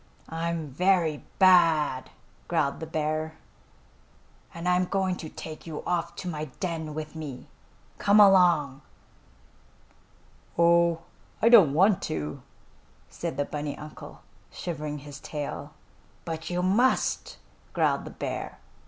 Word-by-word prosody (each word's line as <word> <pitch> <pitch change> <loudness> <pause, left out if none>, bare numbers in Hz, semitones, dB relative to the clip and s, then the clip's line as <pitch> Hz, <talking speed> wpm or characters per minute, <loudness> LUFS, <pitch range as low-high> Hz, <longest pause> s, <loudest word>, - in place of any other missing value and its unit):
"I'm 165 -1 -3
very 170 0 +1
bad!" 165 -8 +4 0.4
growled 155 -5 0
the 160 - -6
bear, 155 0 -2 1.1
"and 170 +1 -6
I'm 180 0 +3
going 190 -1 0
to 160 - -7
take 155 +2 -9
you 155 -2 -6
off 170 -1 -1
to 185 - -7
my 155 -3 -3
den 160 -5 -3
with 155 -1 -5
me. 145 -5 -7 0.5
Come 205 +1 +4
along!" 175 -9 +5 1.8
"Oh, 170 0 +4 0.4
I 230 - +4
don't 190 - +7
want 190 +3 +4
to," 75 -1 -4 0.7
said - - -5
the 145 - 0
bunny 145 0 -4
uncle, 155 0 -11 0.3
shivering 150 -3 -5
his 145 0 -10
tail. 145 -1 -6 0.5
"But 160 -1 -5
you 180 0 -1
must!" 230 +8 +1 0.4
growled - - +1
the - - -6
bear. - - -5
165 Hz, 120 wpm, -27 LUFS, 150-180 Hz, 1.8 s, don't